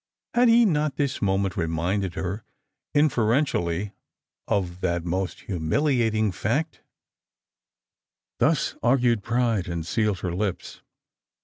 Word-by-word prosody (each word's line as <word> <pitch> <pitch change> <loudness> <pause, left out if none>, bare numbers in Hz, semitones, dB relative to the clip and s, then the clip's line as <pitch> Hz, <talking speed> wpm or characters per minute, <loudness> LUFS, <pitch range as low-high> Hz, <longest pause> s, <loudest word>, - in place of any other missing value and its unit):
Had 245 +1 +4
he 235 +1 +6
not 155 -6 +1
this 140 -2 -1
moment 95 -1 0
reminded 90 +2 -1
her, 95 +3 -3 0.5
inferentially, 110 - +1 0.5
of 90 -2 -1
that 85 0 -1
most 90 +2 -2
humiliating 110 - +1
factP 135 - -2 1.6
Thus - - +2
argued 120 -2 +3
pride, 115 -4 0
and 85 -2 -4
sealed 105 -1 0
her 90 -2 -2
lips. 95 0 -3
105 Hz, 105 wpm, -25 LUFS, 90-125 Hz, 1.6 s, he